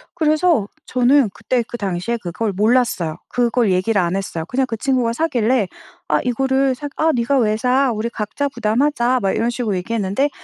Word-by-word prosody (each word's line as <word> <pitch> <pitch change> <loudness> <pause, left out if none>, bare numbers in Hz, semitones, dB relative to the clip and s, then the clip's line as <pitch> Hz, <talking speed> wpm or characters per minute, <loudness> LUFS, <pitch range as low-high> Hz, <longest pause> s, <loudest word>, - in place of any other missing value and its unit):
그래서 310 - +2 0.2
저는 255 0 +3
그때 250 -2 -1
그 240 - -6
당시에 200 +2 -2
그걸 200 +4 -2
몰랐어요. 210 -5 +1
그걸 240 -3 +1
얘기를 185 +3 +1
안 175 +1 -1
했어요. 180 -4 -4
그냥 265 +1 0
그 225 - -4
친구가 250 -1 0
사길래 245 - +1 0.4
아 - - +2
이거를 265 +2 +1
사 290 +3 -6
"아 320 0 +3
네가 245 +3 +1
왜 215 -2 +1
사. 255 +2 +2
우리 220 +2 -2
각자 235 +5 -3
부담하자." 250 +2 +1
막 195 - +1
이런 230 +1 0
식으로 235 -4 -2
얘기했는데 215 +7 -1
235 Hz, 370 characters per minute, -19 LUFS, 210-265 Hz, 0.4 s, 저는